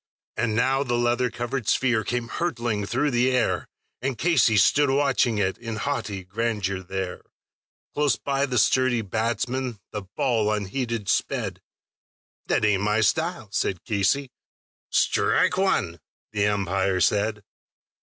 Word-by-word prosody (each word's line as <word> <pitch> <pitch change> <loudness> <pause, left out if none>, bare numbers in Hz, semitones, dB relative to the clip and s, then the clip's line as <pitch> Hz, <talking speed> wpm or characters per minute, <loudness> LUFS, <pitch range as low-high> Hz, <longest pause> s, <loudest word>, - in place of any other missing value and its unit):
And 115 -2 0
now 130 +4 +2
the 120 -4 0
leather 120 +1 +1
covered 120 0 -4
sphere 120 -4 +2
came 120 +1 -2
hurtling 120 - -2
through 145 +6 0
the 120 +1 +3
air, 125 -2 0 0.3
And 130 -1 -2
Casey 140 -10 +3
stood 145 +8 +4
a 135 - +2
watching 135 -5 +2
it 95 -2 0
in 115 -2 -5
haughty 105 -6 -3
grandeur 100 -1 -2
there; 95 0 -5 0.7
Close 145 -1 +2
by 140 0 -1
the 125 -2 -1
sturdy 120 +1 +3
batsman 115 +3 -2
the 105 - -4
ball 110 +2 0
unheeded 110 +1 -2
sped: - - -1 0.9
"That - - +2
ain't 100 -2 +2
my 105 +2 +2
style," 160 - 0
said 95 -3 -1
Casey. 110 +6 0 0.6
"Strike 180 - +2
one," 120 - +1 0.3
the 105 -1 +1
umpire 95 -2 0
said. 105 +2 +1
115 Hz, 135 wpm, -25 LUFS, 105-130 Hz, 0.9 s, stood